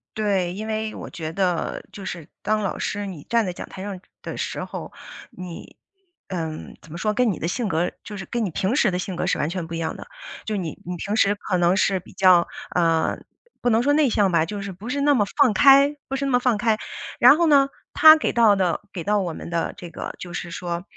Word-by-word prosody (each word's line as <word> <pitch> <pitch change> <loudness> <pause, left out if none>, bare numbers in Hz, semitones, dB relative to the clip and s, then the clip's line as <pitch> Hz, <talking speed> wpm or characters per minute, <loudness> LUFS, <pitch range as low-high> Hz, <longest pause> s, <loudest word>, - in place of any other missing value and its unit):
对， 195 -5 0
因 215 +3 -6
为 220 0 -3
我 - - -8
觉 160 -2 -6
得 180 -1 -1
就 200 - -9
是 170 -5 -6
当 215 +1 0
老 195 - -2
师 205 0 -2
你 170 -7 -8
站 230 -2 +2
在 180 - -3
讲 - - -8
台 190 - -8
上 195 -2 -5 0.2
的 - - -5
时 - - -3
候， - - -7 0.4
你 180 -2 -9 0.5
嗯， 160 -4 -5
怎 160 - -16
么 170 - -6
说， 210 +3 0
跟 240 -1 +2
你 170 - -4
的 165 - -2
性 220 +5 -2
格 175 -1 0
就 205 -2 -8
是 190 - -6
跟 235 -2 -2
你 190 - -2
平 190 +8 -1
时 240 - +3
的 180 - -1
性 185 0 -4
格 - - -2
是 - - +1
完 - - 0
全 175 -2 -4
不 165 - -8
一 - - -3
样 160 -1 -3
的， - - -10 0.4
就 215 - -2
你 170 -6 -4
你 180 +1 -4
平 200 +5 -3
时 205 -2 +3
可 200 -2 -2
能 175 +2 +3
是 195 -2 +2
比 180 - -16
较， 185 -2 +5 0.3
呃， 165 -2 +2 0.4
不 245 - +2
能 225 +1 +3
说 290 +2 +3
内 295 -3 +4
向 205 -4 +2
吧， 165 -2 +3
就 205 +3 -5
是 200 - -5
不 195 +6 -9
是 280 +2 -1
那 290 +1 +4
么 220 -7 +3
放 275 -6 +5
开 280 +3 +6
不 270 - -3
是 275 +1 -2
那 275 - 0
么 245 - +4
放 250 -3 +1
开。 220 0 +1 0.4
然 290 - +8
后 340 - +3
呢， 280 -2 +5 0.2
他 315 0 +9
给 - - -1
到 225 -4 +5
的 185 -1 0
给 175 -4 -5
到 210 +2 +2
我 180 -4 -2
们 170 - -8
的 170 -1 -1
这 175 - -8
个 - - -6
就 175 -1 -8
是 175 - -5
说， 175 0 -4
195 Hz, 270 characters per minute, -23 LUFS, 175-230 Hz, 0.5 s, 他